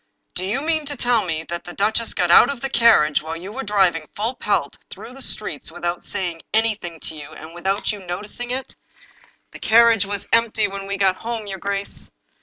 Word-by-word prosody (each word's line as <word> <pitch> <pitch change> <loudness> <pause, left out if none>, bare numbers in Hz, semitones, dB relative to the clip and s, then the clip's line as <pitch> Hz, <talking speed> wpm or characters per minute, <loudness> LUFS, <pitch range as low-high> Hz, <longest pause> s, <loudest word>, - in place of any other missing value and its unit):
" - - -47
Do - - -2
you 210 +8 -1
mean 315 -1 +2
to 290 -1 -4
tell 240 -3 +2
me 160 -2 -2
that 170 +1 -5
the 175 - -9
duchess 220 +4 +1
got 175 -1 +2
out 240 - +8
of 280 - -6
the 270 +1 -3
carriage 220 -11 +5
while 160 +1 -5
you 185 +4 -8
were 260 +5 -5
driving 190 -8 +2
full 225 +4 -1
pelt - - -1
through 245 - -10
the 270 - -9
streets 210 - -1
without 175 0 -3
saying 175 -5 -4
anything 215 -7 0
to 160 - -5
you, 150 -1 -9
and 160 +1 -11
without 190 +5 -1
you 210 - -6
notic 185 +5 -6
ing 245 - -3
it?" 260 +2 -4 0.8
"The - - -10
carriage 225 -2 +5
was 200 -1 -3
empty 225 -2 +3
when 195 0 -7
we 200 0 -2
got 190 -1 +2
home, 230 -1 -4
your 195 -2 -6
grace." 200 +1 -2
200 Hz, 215 wpm, -22 LUFS, 175-230 Hz, 0.8 s, out